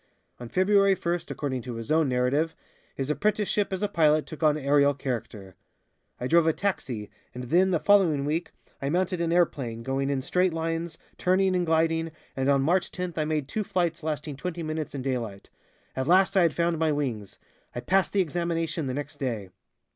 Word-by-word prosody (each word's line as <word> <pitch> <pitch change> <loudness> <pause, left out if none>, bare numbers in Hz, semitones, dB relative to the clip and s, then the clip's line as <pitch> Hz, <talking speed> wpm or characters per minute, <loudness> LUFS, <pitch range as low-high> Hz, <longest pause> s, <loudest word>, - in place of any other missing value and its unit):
On 120 -1 -8
February 195 - +4
first, 170 -1 -3
according 130 -4 -3
to 120 -1 -6
his 115 +5 -6
own 155 -2 +3
narrative, 130 +6 +1 0.4
his 135 +2 -2
apprenticeship 205 +5 0
as 190 +1 -2
a - - +2
pilot 155 -4 +3
took 155 - -10
on 155 -1 +4
aerial 140 0 +3
character. 115 -7 -5 0.7
"I 125 - -3
drove 165 +4 +4
a 160 - +4
'taxi,' 130 - -3 0.2
and 125 - -5
then 185 +3 +4
the 175 -3 +1
following 175 -9 +3
week 160 +4 -2 0.3
I 140 - -1
mounted 180 +2 0
an 165 -1 0
airplane, 135 -10 0
going 135 +2 -1
in 135 -2 -1
straight 180 +4 +1
lines, 165 0 -3 0.2
turning 185 +1 +2
and 175 -1 0
gliding, 165 0 +2 0.3
and 135 +1 0
on 140 -1 +3
March 175 +4 +2
tenth 180 -3 -5
I 155 - +1
made 150 -3 -1
two 215 +8 -2
flights 175 -4 -1
lasting 150 -2 -4
twenty 170 +3 -4
minutes 155 -1 -4
in 135 - -4
daylight. 115 -7 -4 0.4
At 130 0 -2
last 190 +3 +4
I 190 - +5
had 170 -2 +2
found 170 -1 +1
my 160 -1 +2
wings. 125 -9 -3 0.4
I - - -2
passed 190 +8 +1
the 200 - +2
examination 165 -2 -2
the 130 - -2
next 145 +1 -5
day." 115 -9 -3
155 Hz, 190 wpm, -27 LUFS, 135-175 Hz, 0.7 s, I